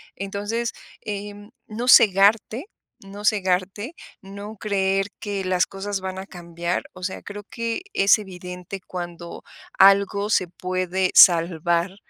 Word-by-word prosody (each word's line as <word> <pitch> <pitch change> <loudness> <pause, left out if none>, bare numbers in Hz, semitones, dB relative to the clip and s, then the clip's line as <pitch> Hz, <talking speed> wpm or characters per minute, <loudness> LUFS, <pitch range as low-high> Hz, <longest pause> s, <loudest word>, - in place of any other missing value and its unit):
Entonces, 205 +4 -3 0.3
em, 205 0 -7 0.2
no 230 +3 -5
cegarte, 215 - +5 0.4
no 200 +1 -10
cegarte, 195 - 0 0.3
no 200 +2 -9
creer 195 -1 0
que 200 -3 -4
las 185 0 +1
cosas 195 0 -4
van 190 0 -5
a 190 - -7
cambiar, 170 -1 -4
o 185 0 -12
sea, 185 - -4
creo 205 0 -8
que 230 +7 -3
es 200 - +5
evidente 180 -1 -8
cuando 175 -1 -7 0.4
algo 200 +1 +5
se 185 - +2
puede 185 +1 -2
salvar, 170 +1 +5
195 Hz, 125 wpm, -23 LUFS, 185-205 Hz, 0.4 s, cegarte